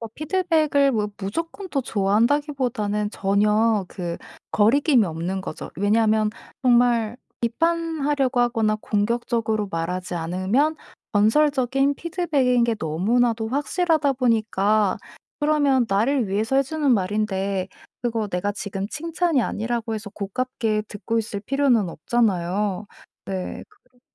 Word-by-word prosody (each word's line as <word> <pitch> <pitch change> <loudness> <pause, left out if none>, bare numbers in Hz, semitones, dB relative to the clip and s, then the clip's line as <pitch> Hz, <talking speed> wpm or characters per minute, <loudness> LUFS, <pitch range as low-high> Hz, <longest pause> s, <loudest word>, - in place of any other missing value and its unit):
어 230 - -5
피드백을 310 -4 +2
뭐 210 -2 0
무조건 330 - -4
또 275 -4 -1
좋아한다기보다는 225 0 0
전혀 210 +1 +2
그 175 -3 -5 0.3
거리낌이 250 +3 +4
없는 175 +3 -3
거죠. 155 - -7
왜냐하면 215 +2 +2 0.3
정말 240 -2 +3 0.2
비판하려고 295 -1 0
하거나 225 -3 +1
공격적으로 220 -1 -1
말하지 180 +2 -3
않으면 185 - 0 0.4
건설적인 270 +4 +2
피드백인 295 -9 +1
게 230 -1 +1
너무나도 220 +8 +1
확실하다 295 +2 +1
보니까 215 -4 +2 0.4
그러면 290 -4 +3
나를 225 +4 +1
위해서 215 +7 0
해 275 - +5
주는 295 0 -1
말인데 195 -1 -1 0.3
그거 230 -3 -1
내가 200 +1 -2
지금 200 -1 -5
칭찬이 330 -1 0
아니라고 225 +1 -2
해서 215 -1 -6
고깝게 215 +1 -2
듣고 225 +2 -2
있을 210 -2 -3
필요는 245 -6 +1
없잖아요. 200 0 0 0.4
네. 190 -2 -4
그래 400 -12 -30
225 Hz, 300 characters per minute, -23 LUFS, 205-275 Hz, 0.4 s, 해